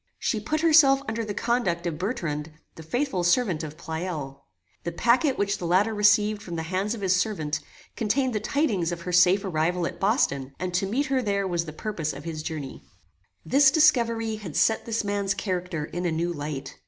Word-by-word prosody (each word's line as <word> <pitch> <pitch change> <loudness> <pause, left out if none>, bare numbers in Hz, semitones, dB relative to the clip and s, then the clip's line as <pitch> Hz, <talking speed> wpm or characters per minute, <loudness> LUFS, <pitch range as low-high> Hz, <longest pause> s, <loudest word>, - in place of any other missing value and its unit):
She 220 - -1
put 305 +9 -2
herself 295 -4 +6
under 225 +1 -2
the 210 -2 -5
conduct 195 -9 0
of 165 -3 -3
Bertrand, 165 - -3 0.2
the - - -11
faithful 215 - -1
servant 175 -2 +2
of 155 0 -7
Pleyel. 160 -5 -5 0.4
The 170 - -3
pacquet 245 - +3
which 200 -3 -1
the 175 - -3
latter 195 +6 +3
received 210 0 +3
from 175 -5 -7
the 160 - -3
hands 190 +6 -1
of 215 - -9
his 190 -1 +2
servant, 180 -6 -1 0.4
contained 250 +4 0
the 215 - 0
tidings 215 - 0
of 170 -1 -5
her 180 - -5
safe 180 +3 +4
arrival 175 0 0
at - - -5
Boston, 140 - 0
and 185 0 -4
to 190 +2 0
meet 255 +9 0
her 265 -1 0
there 200 -3 0
was 170 -2 -1
the 155 - -6
purpose 160 -2 -4
of 140 +1 -9
his 160 -1 -5
journey. 155 -4 -6 0.6
This 275 0 +5
discovery 230 -8 +3
had 185 -8 -8
set 220 - +2
this 230 -1 -1
man's 200 -1 -1
character 180 -5 -3
in 175 +2 -3
a - - 0
new 170 +2 -1
light. 145 -3 -6
190 Hz, 200 wpm, -26 LUFS, 165-225 Hz, 0.6 s, herself